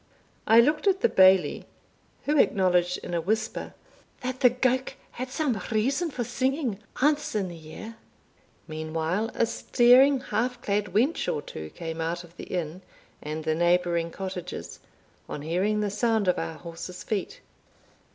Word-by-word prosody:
I 225 +1 +7
looked 300 - +1
at 385 0 +3
the - - +4
Bailie, 190 -1 +4 0.6
who 295 - +1
acknowledged, 180 -4 +3
in - - -6
a 170 - +1
whisper, 215 +6 -2 0.5
"that 255 0 -4
the 250 - +6
gowk 255 +1 0 0.2
had 255 +1 -5
some 255 - -1
reason 270 +9 +1
for 255 -4 -3
singing, 260 -3 -1 0.2
ance 295 -4 +2
in 195 -3 0
the 170 - -8
year." 165 +8 -10 0.7
Meantime 160 +6 -2
a - - +3
staring 250 +4 +5
half 245 +1 -2
clad 205 0 0
wench 240 - +1
or 145 - -3
two 80 0 -8
came 165 - -6
out 170 +2 -2
of 170 0 -17
the - - -8
inn 175 0 -4 0.4
and 155 +1 -5
the 155 0 +1
neighbouring 175 0 +2
cottages, 185 0 -6 0.5
on 145 - -5
hearing 190 +7 0
the 205 -1 -1
sound 220 -1 +1
of 180 - +2
our 165 0 -4
horses' 170 +2 -8
feet. 220 - -3
200 Hz, 155 wpm, -27 LUFS, 170-250 Hz, 0.7 s, I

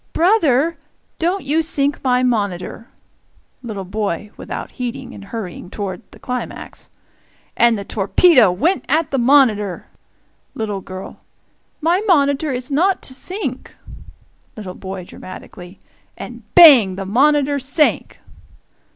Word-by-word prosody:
"Brother, 330 - +2 0.4
don't 355 +3 0
you 300 +4 +1
sink 290 -3 -1
my 250 -1 +2
monitor!" 210 -2 -2 0.7
Little 210 -6 -6
boy 205 0 -3
(without - - -7
heeding, 245 -3 -6
and 200 - -11
hurrying 200 -5 -7
toward 195 -1 -5
the - - -16
climax). 250 0 -7 0.7
"And 235 -1 +4
the 200 - -6
torpedo 220 - +4
went 285 - 0
at 315 +2 +1
the 270 - 0
monitor!" 235 -7 +3 0.7
Little 210 -3 -3
girl. 185 +1 -9 0.6
"My 340 +5 +2
monitor 285 -3 +2
is 255 +2 -4
not 365 +7 +1
to 260 - -4
sink!" 370 +10 -5 0.8
Little 195 -4 -7
boy, 190 -1 -7
dramatically: 185 0 -11 0.4
"And - - -9
bang 265 - +8
the 195 0 -5
monitor 285 +6 +2
sank!" 280 +3 0
250 Hz, 120 wpm, -19 LUFS, 200-295 Hz, 0.8 s, bang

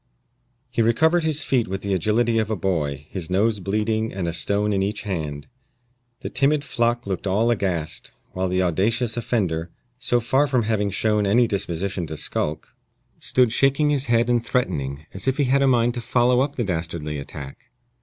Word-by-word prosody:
He 120 - +1
recovered 160 +10 +3
his 155 -1 +1
feet 125 -5 +1
with 95 +1 -4
the 100 -1 -1
agility 110 +5 +2
of 110 -1 -1
a 110 - 0
boy, 75 -7 -2
his 90 -4 -5
nose 105 +3 +1
bleeding 110 +3 -1
and 95 -3 -3
a 85 - -1
stone 100 +4 +1
in 95 - +1
each 105 +2 -2
hand. 75 -8 -4 0.8
The - - -4
timid 145 +1 +2
flock 120 -2 0
looked 100 0 -3
all 110 +5 +2
aghast, 90 -8 -2 0.2
while 95 0 -2
the 90 0 +1
audacious 110 +7 0
offender, 95 -9 -1 0.3
so 125 -2 +1
far 130 +5 +2
from 130 -4 +1
having 105 -2 0
shown 105 +1 +1
any 120 +5 +4
disposition 95 -3 -2
to 80 - -6
skulk, 75 +1 -2 0.5
stood 125 -3 +2
shaking 140 +4 +3
his 140 -1 +1
head 120 0 +3
and 120 -1 +2
threatening, 75 - -2
as 95 +4 -3
if 130 - +1
he 145 - +2
had 135 +1 +2
a 135 - +4
mind 120 -2 +3
to 120 - -4
follow 125 +1 +3
up 140 +1 -1
the 120 - -1
dastardly 80 -5 -3
attack. 70 -1 -9
105 Hz, 185 wpm, -23 LUFS, 90-120 Hz, 0.8 s, any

